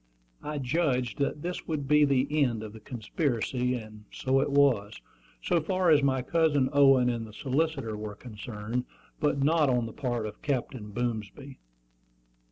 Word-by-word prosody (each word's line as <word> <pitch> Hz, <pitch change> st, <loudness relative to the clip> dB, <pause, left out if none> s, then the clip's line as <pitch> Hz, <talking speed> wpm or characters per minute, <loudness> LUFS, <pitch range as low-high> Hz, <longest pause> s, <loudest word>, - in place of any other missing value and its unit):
I 150 Hz, 0 st, -4 dB
judged 130 Hz, -3 st, 0 dB
that 145 Hz, +1 st, -1 dB
this 180 Hz, +1 st, -4 dB
would 150 Hz, -4 st, -2 dB
be 150 Hz, +1 st, +5 dB
the 135 Hz, -1 st, +2 dB, 0.2 s
end 115 Hz, -4 st, -1 dB
of 105 Hz, -1 st, -8 dB
the 110 Hz, -, -10 dB
conspiracy; 125 Hz, +2 st, -1 dB
and 110 Hz, -2 st, -9 dB
so 135 Hz, 0 st, +1 dB
it 135 Hz, -, +1 dB
was, 125 Hz, -7 st, +2 dB, 0.4 s
so 170 Hz, -, +2 dB
far 185 Hz, +1 st, +2 dB
as 150 Hz, -2 st, +6 dB
my 130 Hz, -2 st, +1 dB
cousin 145 Hz, -3 st, +2 dB
Owen 135 Hz, -3 st, +6 dB
and 115 Hz, -2 st, -2 dB
the 105 Hz, -, -13 dB
solicitor 135 Hz, -2 st, -1 dB
were 105 Hz, -1 st, -6 dB
concerned, 110 Hz, +2 st, -5 dB, 0.3 s
but 145 Hz, -2 st, +1 dB
not 155 Hz, -1 st, +3 dB
on 125 Hz, -2 st, +1 dB
the 115 Hz, -, -7 dB
part 120 Hz, -5 st, -2 dB
of 105 Hz, -1 st, -8 dB
Captain 130 Hz, -6 st, -3 dB
Boomsby. 120 Hz, +3 st, -4 dB
130 Hz, 165 wpm, -28 LUFS, 115-145 Hz, 0.4 s, as